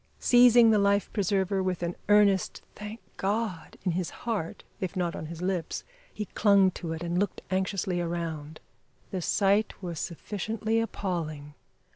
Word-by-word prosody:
Seizing 245 -2 +6
the 215 - +4
life 200 0 +2
preserver 195 -1 +1
with 185 -2 -1
an 170 0 -2
earnest 205 -2 +4
"thank 210 +2 -8 0.2
God" 200 -4 -2
in 185 - +1
his 175 0 -1 0.2
heart 210 -9 -3 0.2
if 185 -4 -3
not 175 -2 -1
on 155 - -5
his 170 +2 -7
lips, 180 -3 -2 0.3
he 210 - -4
clung 200 -1 +4
to 170 -2 -6
it 165 +1 -5
and 175 +1 0
looked 205 - -2
anxiously 185 -1 0
around. 165 -3 -4 0.5
The 185 - -2
sight 200 +4 +2
was 170 -3 -4
sufficiently 215 +5 -2
appalling. 165 -9 -3
190 Hz, 150 wpm, -28 LUFS, 170-205 Hz, 0.5 s, Seizing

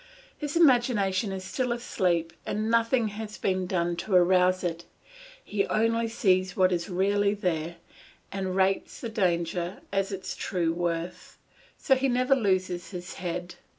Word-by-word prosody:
His 295 0 -5
imagination 235 - +3
is 190 -1 -5
still 250 +5 -2
asleep 175 -8 0
and 215 +2 -2
nothing 230 0 +2
has 210 0 -7
been 185 -1 -1
done 175 -2 0
to 195 +2 -1
arouse 185 +1 +4
it; 170 -1 -3 0.6
he 200 -1 -1
only 230 +1 +1
sees 185 -5 +1
what 185 -1 +4
is 170 0 -1
really 200 +2 +1
there, 170 -4 -2 0.6
and 190 -1 -3
rates 190 0 +1
the 235 - -5
danger 175 -3 -1
at 195 0 0
its 190 -1 -5
true 170 -3 -1
worth; 170 0 -4 0.4
so 270 - +3
he 265 +1 +1
never 255 +2 +3
loses 185 -6 0
his 180 -2 -7
head. 175 0 -4
190 Hz, 150 wpm, -27 LUFS, 180-220 Hz, 0.6 s, arouse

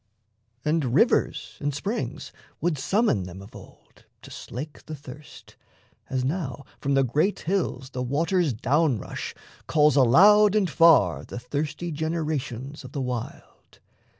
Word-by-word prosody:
And 150 -6 +1
rivers - - +1
and 145 -1 -2
springs 200 +11 -4 0.3
would 170 -5 -1
summon 190 - +1
them 90 +1 -9
of 100 - -13
old - - -16 0.2
To - - -12
slake 145 +5 -8
the 155 - -5
thirst, 145 +1 -13 0.5
as 130 -1 -1
now 140 -3 -3
from 140 0 0
the 135 - +4
great 150 - 0
hills 160 -8 -2
The 125 - -4
water's 160 +6 +1
down 135 +4 +1
rush - - -6 0.3
calls 150 -1 +4
aloud 200 - +6
and 205 -3 +3
far 165 -1 +4
The - - -8
thirsty 145 +7 -4
generations 150 -4 -3
of 130 +1 -11
the 140 - -2
wild. 125 -3 -7
145 Hz, 140 wpm, -25 LUFS, 130-165 Hz, 0.5 s, aloud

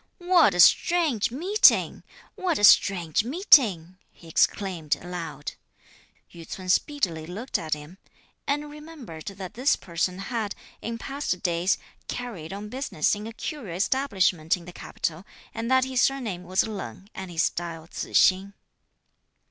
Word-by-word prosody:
"What 350 - +4
a - - -3
strange 310 - +4
meeting! 360 - +3 0.3
What 350 -5 -1
a - - -4
strange 180 -4 +5
meeting!" 220 - +4
he 170 - -17
exclaimed 165 -1 +1
aloud. 165 -4 -6 0.8
Yü 170 - -10
ts'un 185 -1 -7
speedily 180 - 0
looked 215 +9 -3
at 155 -2 -2
him, 150 +6 -12 0.5
(and 295 +1 -2
remembered) 295 - -11
that 195 -2 -7
this 255 +5 +2
person 180 +1 -3
had, 210 +1 -3 0.3
in 230 +1 -4
past 270 -7 -4
days, 175 +1 +1 0.3
carried 210 -11 -6
on 200 +2 -6
business 250 - -1
in 210 +1 -4
a - - -6
curio 225 - -6
establishment 190 - +1
in 170 - -13
the 180 - -10
capital, 165 0 -4 0.3
and 230 +1 -4
that 260 0 +4
his 260 -1 0
surname 225 -10 -1
was 185 +2 +1
Leng 195 - -7
and 190 -1 -7
his 165 -1 0
style 165 -2 -3
Tzu - - -7
hsing. 195 +1 +4
195 Hz, 145 wpm, -26 LUFS, 175-260 Hz, 0.8 s, strange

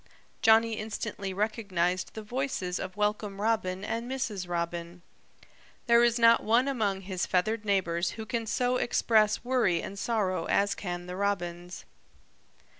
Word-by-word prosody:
Johnny 225 0 +4
instantly 210 -2 -4
recognized 190 -3 -1
the 220 - -6
voices 225 -6 -2
of 185 +1 -6
Welcome 210 -1 -1
Robin 205 -4 0
and 230 +2 -3
Mrs. 210 -9 -3
Robin. 170 0 -4 0.8
There 235 0 +5
is 235 0 +3
not 230 0 +5
one 235 +5 +3
among 210 -8 0
his 185 -2 -3
feathered 215 +4 0
neighbors 175 -4 0
who 220 - -5
can 230 0 -3
so 245 +2 +1
express 220 -3 +2
worry 240 -9 +2
and 200 +3 -6
sorrow 190 -7 0
as 200 0 +2
can 175 -2 -5
the 180 0 -6
Robins. 180 -3 -3
205 Hz, 140 wpm, -29 LUFS, 185-230 Hz, 0.8 s, There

